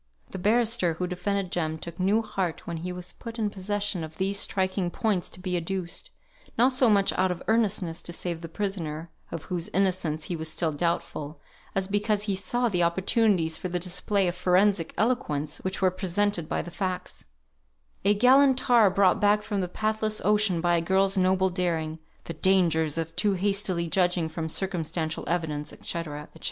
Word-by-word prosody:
The 190 - -5
barrister 215 -4 +2
who 180 - -2
defended 185 +1 -2
Jem 160 -2 -1
took 170 +1 -8
new 205 +5 +2
heart 190 -6 -3
when 170 -1 -4
he 180 +3 -4
was 180 0 -6
put 230 -1 -9
in 215 -2 0
possession 200 -2 -2
of 155 0 -9
these 195 +1 0
striking 185 -2 0
points 195 0 -1
to - - -11
be 180 -1 -2
adduced, 180 - -3 0.5
not 250 +3 +5
so 255 -2 +4
much 200 -2 +3
out 185 0 +2
of 180 -1 -4
earnestness 205 -7 +1
to - - -7
save 170 -1 -3
the 165 - -7
prisoner, 165 -4 -3 0.2
of 165 - -5
whose 180 +2 -3
innocence 180 -6 0
he 175 - -3
was 160 -1 -4
still 160 +1 -1
doubtful, 150 -2 -2 0.4
as 190 -1 0
because 205 +1 +1
he 205 -2 0
saw 240 +6 0
the 180 -6 +1
opportunities 175 -1 +2
for 185 - -4
the 180 - -1
display 180 +2 0
of 175 - 0
forensic 180 -1 +2
eloquence 155 - 0
which 190 +1 -3
were 185 - +5
presented 185 -1 -1
by - - -1
the 175 - -8
facts; 185 0 -4 0.8
"a 205 +2 +4
gallant 265 +4 +5
tar 240 -5 +5
brought 190 0 +3
back 210 0 +4
from 205 -3 -2
the 180 - -1
pathless 215 +2 -1
ocean 210 -5 +3
by 175 0 +3
a - - +1
girl's 190 +3 +2
noble 190 0 +2
daring," 165 -3 -1 0.2
"the 165 - -6
dangers 165 -3 +2
of 165 0 -3
too 205 -2 +2
hastily 195 -2 0
judging 175 0 +2
from 160 0 -4
circumstantial 165 -3 -2
evidence," 155 -4 -2
&c., - - -9
&c. 170 - -1
185 Hz, 185 wpm, -27 LUFS, 170-205 Hz, 0.8 s, not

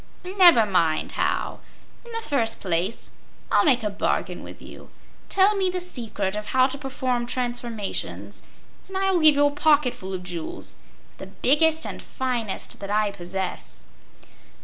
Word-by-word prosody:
"Never 360 - +7
mind 165 -6 +1
how. - - -1 0.4
In 475 - -12
the 455 0 -5
first 235 -6 0
place, 185 +4 -2 0.4
I'll - - +4
make 250 -6 +3
a 210 - 0
bargain 200 - -2
with - - -10
you. - - -12 0.4
Tell 395 +2 +4
me 380 -2 +1
the 365 0 -2
secret 225 - -3
of 210 0 -5
how 255 0 +4
to 270 +1 -3
perform 255 -3 -2
transformations 220 - -4 0.5
and 385 0 -5
I 385 0 +1
will 360 - +2
give 310 -2 +6
you 290 0 +4
a 290 - +2
pocketful 290 -10 +1
of 180 - -6
jewels, 175 -3 -6 0.5
the - - -8
biggest 320 +4 +2
and - - -6
finest 245 -6 -4
that 200 - -7
I 210 0 +1
possess." 190 0 -5
245 Hz, 155 wpm, -24 LUFS, 200-310 Hz, 0.5 s, Never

